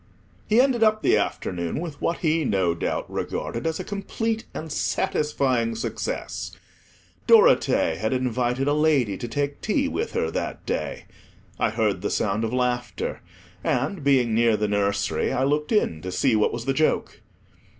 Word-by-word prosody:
He 220 +2 +4
ended 255 -3 +3
up 215 -1 +3
the - - +4
afternoon 85 - -2
with 160 -4 -6
what 170 - 0
he 160 +1 +2
no 95 - +1
doubt 85 - -2
regarded 115 +6 -3
as 160 +2 -2
a - - -3
complete 220 +3 -3
and 160 0 -7
satisfying 130 -7 0
success. 115 - -4 0.7
Dorothea 465 +2 +5
had - - -1
invited 125 +1 0
a 145 - +3
lady 150 -9 +2
to 120 - -5
take 140 +4 -2
tea 275 +6 +1
with 445 +11 -3
her - - 0
that - - -4
day. - - -3 0.5
I - - +2
heard 110 -4 0
the 105 - -1
sound 105 +2 0
of 110 - -1
laughter, 125 -1 -2 0.4
and, 190 -7 -1
being 130 -5 +3
near 115 -1 +3
the 105 - 0
nursery, 100 0 0
I 130 - 0
looked 150 +2 0
in 85 - +1
to 95 - -5
see 110 +6 +2
what 105 - +2
was 115 0 -5
the 135 - +1
joke. 155 +3 0
130 Hz, 165 wpm, -24 LUFS, 110-160 Hz, 0.7 s, Dorothea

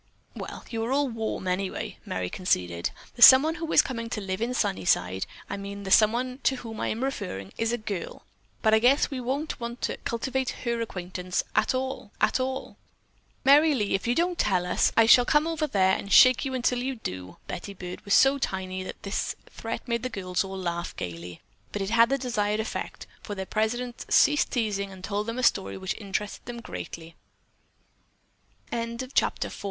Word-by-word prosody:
"Well, - - -7
you 225 -1 -2
are 235 - -2
all 280 0 +2
warm 225 -4 -3
anyway," 185 +1 -3
Merry 95 -1 -2
conceded. 90 - 0 0.3
"The 240 - -10
someone 270 +6 +9
who 330 -1 -3
is - - +6
coming 230 -3 -4
to 230 - -3
live 190 0 -4
in 245 +2 -1
Sunnyside; 95 - +1 0.2
I 200 - -4
mean 200 0 -7
the 190 - -5
someone 240 +5 +3
to 265 - +3
whom 225 -3 -8
I - - -1
am 230 +4 -2
referring, 185 - -4
is 225 0 0
a 240 - 0
girl, 210 -5 -6 0.4
but 220 -1 +4
I 220 - +6
guess 260 +6 +3
we 260 -2 -3
won't 275 +6 -3
want 235 +1 -5
to - - -1
cultivate 260 +2 -2
her 235 -1 -1
acquaintance 180 -3 -3
at - - +2
all, 260 -4 -3
at 215 +5 +2
all." 260 +1 -3 0.7
"Merry 295 +2 +6
Lee, 210 -5 0
if 195 - -1
you 240 - +2
don't 350 +1 0
tell 185 -4 +2
us, 180 - +2
I 225 - +7
shall 245 +2 +8
come 295 +5 +3
over 325 -2 -1
there 190 -6 +3
and 200 - -6
shake 255 +2 +7
you 265 -1 -2
until 250 0 +1
you 265 +1 -2
do." 95 - -7
Betty 200 +3 -6
Byrd 180 -1 -8
was 200 - +2
so 275 +1 +5
tiny 185 -5 -3
that 185 - -8
this 200 - -2 0.2
threat 225 +3 -6
made 235 -1 0
the 255 - -3
girls 185 -5 -2
laugh 180 -3 -4
gaily, 85 -1 -7 0.3
but 205 - -3
it 195 - -4
had 230 0 +5
the 275 - +2
desired 215 -5 -1
effect, 220 - -4 0.2
for 205 - -6
their 190 -1 -4
president 235 +4 -2
ceased 295 0 +4
teasing 205 -5 -1
and 190 -1 -12
told 205 +2 -2
them 230 +1 -3
a 255 - -2
story 195 -5 +2
which 190 0 -3
interested 205 0 -4
them 240 -1 -6
220 Hz, 190 wpm, -27 LUFS, 190-255 Hz, 0.7 s, someone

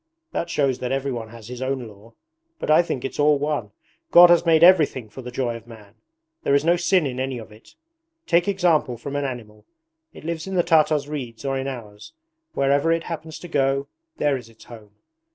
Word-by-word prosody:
That 170 - -3
shows 135 -5 0
that 125 0 -3
everyone 130 -4 -3
has 115 -1 -12
his 125 +1 -8
own 130 -2 -2
law. 105 +2 -16 0.4
But 240 - -2
I 155 - +7
think 135 -7 -4
it's 135 - -6
all 145 0 +4
one. 145 -7 -2 0.4
God 175 0 +8
has 175 0 +4
made 160 0 +5
everything 155 -10 +5
for 130 - -10
the 125 - -8
joy 125 -1 -2
of 115 0 -11
man. 105 -3 -14 0.5
There 140 - +2
is 140 +2 +2
no 170 +1 +4
sin 180 -1 +2
in 130 -2 -4
any 130 -1 -2
of 110 -2 -10
it. 110 +2 -18 0.5
Take 170 +2 +2
example 175 -10 +1
from 140 +4 -7
an 145 0 -1
animal. 110 -5 -8 0.4
It - - -14
lives 165 +1 -4
in 190 - -4
the 175 - +3
Tartar's 155 -3 +3
reeds 130 -5 -6
or 135 0 -1
in 135 0 -3
ours. 110 - -9 0.4
Wherever 140 +4 +2
it 165 0 +1
happens 160 -2 -7
to 175 - -10
go, 140 -2 0 0.3
there 145 -2 +1
is 120 -3 -8
its 115 -1 -18
home! 105 -3 -14
135 Hz, 210 wpm, -23 LUFS, 120-160 Hz, 0.5 s, God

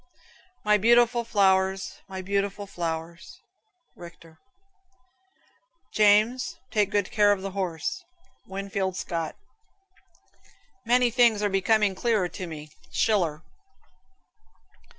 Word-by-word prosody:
"My 210 0 +4
beautiful 235 +2 +4
flowers, 190 -3 +1
my 190 -1 -6
lovely 200 +1 -2
flowers." 170 -2 -6 0.6
Richter. 165 -2 -14 1.5
"James, 215 +4 +3
take 210 -3 +1
good 205 -2 -1
care 205 -1 +4
of 195 -2 -1
the 195 - -4
horse." 165 -6 -3 0.4
Winfield 195 -1 -3
Scott. 165 -4 -4 1.5
"Many 245 0 +3
things 230 -3 +3
are 205 - +2
becoming 200 +1 +2
clearer 215 -2 0
to 180 +1 -7
me." 155 -2 -9 0.2
Schiller. 175 -8 0
195 Hz, 95 wpm, -26 LUFS, 180-210 Hz, 1.5 s, My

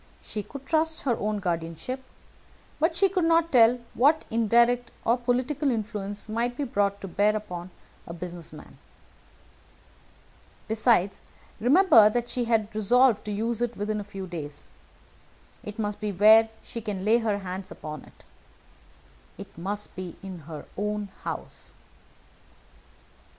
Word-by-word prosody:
She 210 - -4
could 275 +6 -10
trust 320 +1 +1
her 245 -4 +1
own 210 0 -1
guardianship, 175 - -3 0.8
but 325 +2 +2
she 390 +3 +4
could 370 -2 0
not 330 0 +3
tell 240 -2 +6 0.2
what 295 +6 +3
indirect 235 +2 +3 0.2
or 235 - +4
political 255 +4 0
influence 210 -3 -3
might 235 +3 -2
be 290 - -1
brought 200 -6 0
to 195 - -5
bear 205 +3 +2
upon 180 -4 -5 0.4
a 170 - -6
business 175 -1 -7
man. 155 - -13 1.9
Besides, 220 -3 +2 0.4
remember 250 - +6
that 240 +2 -2
she 245 -1 -1
had 225 -2 +1
resolved 235 +2 +4
to 210 - -3
use 225 +3 -1
it 240 -1 -1
within 210 +1 -2
a - - -4
few 195 -1 -7
days. 155 -5 -7 1.0
It 210 0 -8
must 210 -2 -2
be 210 -1 -2
where 220 +4 +6
she 230 - -6
can 200 -3 -4
lay 225 +3 +5
her 215 -3 0
hands 190 -1 -6
upon 150 -2 -7
it. - - -20 1.1
It - - -10
must 200 +5 -4
be 185 -2 -6
in 190 -2 -7
her 155 -2 -7
own 210 0 -2
house." - - -6
215 Hz, 145 wpm, -26 LUFS, 200-245 Hz, 1.9 s, tell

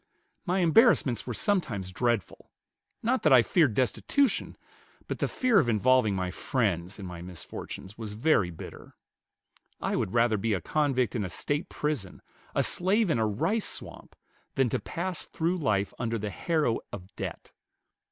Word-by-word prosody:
My 185 +2 +2
embarrassments 165 - +4
were 120 - -2
sometimes 115 - 0
dreadful; 120 -1 -1 0.5
not 250 +3 +1
that 155 - +3
I 125 -3 +8
feared 145 - +3
destitution, 240 - +1 0.5
but - - -4
the - - +1
fear 250 -5 +3
of 125 - +1
involving 115 -1 +3
my 90 -1 -2
friends 95 - -1
in 100 - -7
my 90 -2 -7
misfortunes 90 +3 -8
was 110 -2 -5
very 110 - +2
bitter.... 85 - -10 0.8
I - - -1
would - - -1
rather 115 -2 +3
be 110 +1 0
a - - -2
convict 130 - 0
in 110 - 0
a 95 - -3
State 145 - -2
prison, 145 -12 -3 0.3
a - - +3
slave 195 +2 +1
in 120 - +1
a 110 - +2
rice 195 - 0
swamp, - - -8 0.4
than 135 -2 +2
to - - -1
pass 175 0 -3
through 170 +3 -1
life 105 - 0
under 115 -1 -1
the 105 -1 -4
harrow 155 - 0
of 95 0 -9
debt. - - -6
120 Hz, 160 wpm, -28 LUFS, 100-160 Hz, 0.8 s, I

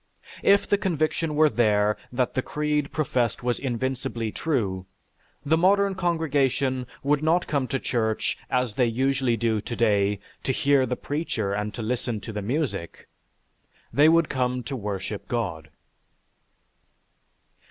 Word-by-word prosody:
If 200 0 +4
the 205 - +2
conviction 160 -3 0
were 155 +1 +6
there 105 -4 +2 0.2
that 125 0 0
the 130 - 0
creed 150 +1 -1
professed 125 -7 0
was 120 -1 0
invincibly 125 -3 -2
true, 100 - -1 0.6
the 160 +3 +3
modern 200 +2 +4
congregation 140 -7 0 0.2
would 145 +1 +2
not 165 +3 +2
come 140 -3 -1
to 135 - -1
church, 110 -4 -1
as 125 -4 0
they 125 +2 +2
usually 130 0 +1
do 110 -1 0
today, 105 -4 +1 0.2
to - - 0
hear 140 -3 +3
the 125 - -1
preacher 125 -11 -2
and 105 +1 -2
to 115 - -4
listen 120 -1 -2
to 110 - -7
the 105 - -3
music. 105 - -3 0.8
They 150 +2 +6
would 165 -1 +4
come 125 -1 -1
to 135 +4 -4
worship 105 -2 -4
God. 85 -10 -3
125 Hz, 140 wpm, -25 LUFS, 110-150 Hz, 0.8 s, were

